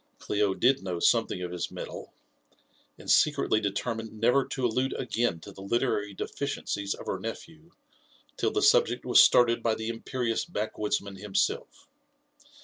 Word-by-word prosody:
Clio 105 -2 0
did 130 +2 +3
know 90 -3 -4
something 90 - +2
of 90 - -5
his 90 -1 -3
metal, - - -8 0.9
and - - -14
secretly 145 -7 +3
determined 110 +2 -3
never 125 +5 +3
to 130 - -3
allude 125 +3 0
again 120 -8 -1
to 100 - -10
the 95 - -12
literary 105 -1 -1
deficiences 100 -8 -3
of - - -11
her 95 - -3
nephew 160 - -8 0.7
till - - 0
the 415 - -1
subject 470 +3 +3
was - - +7
started 120 -1 +5
by 115 -1 +1
the 110 +1 -4
imperious 115 0 -2
back 110 -11 -4
woodsman 100 -2 -2
himself. 105 - -2
115 Hz, 150 wpm, -28 LUFS, 100-130 Hz, 0.9 s, was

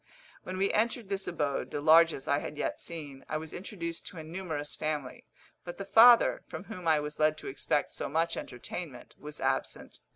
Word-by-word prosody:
When 185 0 -6
we 195 +1 +1
entered 225 -1 0
this 195 -1 -2
abode, 145 -5 -1
the - - -3
largest 160 -1 +5
I 140 0 +2
had 150 - -7
yet - - -2
seen, 145 -5 -7
I 155 - -1
was 160 0 -8
introduced 170 -3 -5
to - - -9
a 160 - -6
numerous 160 -3 -4
family; 150 -4 -4 0.4
but 175 - -7
the 195 - -5
father, 230 +4 +7
from - - -7
whom 185 -5 -7
I 155 -2 +5
was 150 0 -6
led 155 0 +3
to - - -9
expect 140 +2 -1
so - - -4
much 165 +3 +1
entertainment, 125 +2 -7
was 150 +1 -9
absent. 135 0 -2
160 Hz, 195 wpm, -30 LUFS, 150-185 Hz, 0.4 s, father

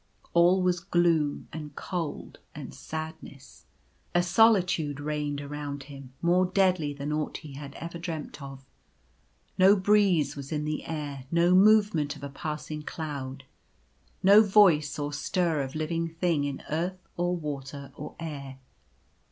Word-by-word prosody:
All 175 +2 +5
was 180 -1 +2
gloom 170 -5 +1
and 150 -2 -7
cold 170 -6 -5 0.2
and - - -8
sadness. 155 -4 -8 0.5
A 175 - +4
solitude 180 -6 +3
reigned 145 -1 -2
around 145 -1 -5
him, 135 -2 -11
more 180 +2 +4
deadly 185 -5 +2
than 145 +1 -4
aught 150 0 -2
he 150 -3 -11
had 140 0 -9
ever 170 +1 -7
dreamt 160 -4 -6
of. 135 -1 -9 0.9
No 190 +2 +7
breeze 190 -7 +3
was 140 -1 -8
in 150 -1 -1
the 155 0 -3
air; 145 -4 -5
no 170 +2 +3
movement 195 -7 +4
of 145 - -13
a 140 - -4
passing 150 +1 -5
cloud. 140 -4 -6 0.8
No 200 +3 +8
voice 190 -9 +4
or 145 0 -3
stir 165 +1 0
of 135 +1 -5
living 165 +2 -1
thing 165 -3 0
in 140 -1 -4
earth, 180 +4 -3
or 175 +1 0
water, 140 -3 -6
or 150 - -8
air. 140 -5 -6
155 Hz, 145 wpm, -28 LUFS, 145-175 Hz, 0.9 s, No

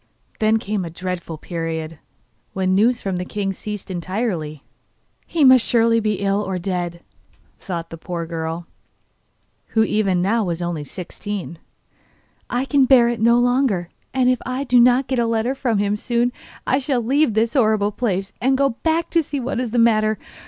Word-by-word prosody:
Then 220 0 +3
came 210 -3 -2
a 170 - -5
dreadful 175 -1 -5
period, 165 -1 -5 0.5
when 185 -1 0
news 230 +5 +3
from 190 -2 -2
the 180 - -2
king 195 +1 -3
ceased 210 0 -7
entirely. 175 - -3 0.6
'He 325 -3 +1
must 260 -3 +7
surely 230 -1 +3
be 215 -1 0
ill 200 +1 0
or 190 -2 -3
dead,' 175 -2 -3 0.6
thought 170 -4 -5
the 165 - -8
poor 170 -1 -4
girl, 165 0 -4 1.1
who 220 - +6
even 200 -4 +1
now 215 +5 +1
was 175 -3 -2
only 170 -3 -3
sixteen. 180 +1 -7 0.9
'I 245 +2 -1
can 275 -1 +3
bear 245 -2 +6
it 240 -2 -3
no 235 +1 +5
longer, 245 -8 +1 0.2
and 260 -1 +1
if 255 -1 +3
I 255 +2 -3
do 250 -2 +4
not 250 +2 +5
get 260 -1 -1
a 235 - +2
letter 230 +3 0
from 245 -5 -1
him 205 0 +1
soon 240 +2 0 0.3
I 265 - +2
shall 260 -3 -1
leave 275 0 +2
this 225 +1 +1
horrible 215 -5 +2
place 200 -3 -2
and 265 +1 +2
go 275 0 +3
back 320 +7 -1
to 335 - +3
see 285 -2 -4
what 250 -1 -3
is 250 -2 -2
the 240 - -2
matter. 215 -2 +3
215 Hz, 180 wpm, -21 LUFS, 180-245 Hz, 1.1 s, must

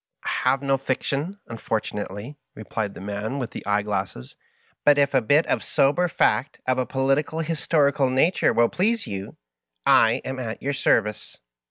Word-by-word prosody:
'' - - -27
I - - 0
have 135 +1 +1
no 135 0 +2
fiction, 140 +7 -2
unfortunately," 110 +1 -4 0.2
replied 110 -1 -4
the - - -9
man 105 +6 -4
with 125 -4 -4
the - - -7
eyeglasses^ 100 -10 -2
*^ - - -37 0.5
but 145 -1 +5
if 140 0 +2
a 130 - +4
bit 145 +8 +3
of - - -1
sober 150 +6 +2
fact 130 -4 0
of 130 0 +1
a 130 - -1
political 135 +4 0
historical 150 -4 +1
nature 135 +8 +2
will 120 0 +3
please 220 +4 0
you, 100 0 -7 0.5
I - - +5
am 130 0 -4
at 115 -3 -5
your 140 +1 -2
service." 105 -5 0
130 Hz, 170 wpm, -24 LUFS, 110-145 Hz, 0.5 s, but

